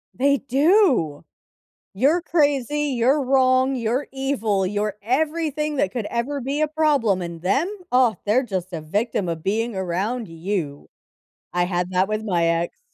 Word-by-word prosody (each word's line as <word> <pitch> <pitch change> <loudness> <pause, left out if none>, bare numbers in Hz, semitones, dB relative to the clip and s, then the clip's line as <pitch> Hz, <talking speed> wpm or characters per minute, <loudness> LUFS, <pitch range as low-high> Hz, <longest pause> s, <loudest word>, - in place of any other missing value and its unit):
They 280 +2 +3
do! 275 - +2 0.7
"You're 285 - +2
crazy, 295 -3 +1
you're 265 +5 +3
wrong, 260 0 +3
you're 245 +4 -1
evil, 230 -8 -1
you're 205 +1 -2
everything 300 +5 -1
that 195 -7 0
could 230 -4 -3
ever 270 +4 -2
be 280 +4 -2
a 310 - +3
problem. 285 - +1
And 170 -1 -6
them? 275 - +1 0.2
Oh, 250 -4 +4
they're 225 +6 +3
just 185 -6 -4
a 160 - -4
victim 200 +2 -1
of 160 -1 -4
being 225 +2 -1
around 190 +6 -2
you." 165 -3 -4 0.6
I 175 0 +2
had 180 0 -2
that 185 +1 +2
with 215 0 -2
my 175 -5 +1
ex. 170 +1 -1
235 Hz, 155 wpm, -22 LUFS, 185-275 Hz, 0.7 s, Oh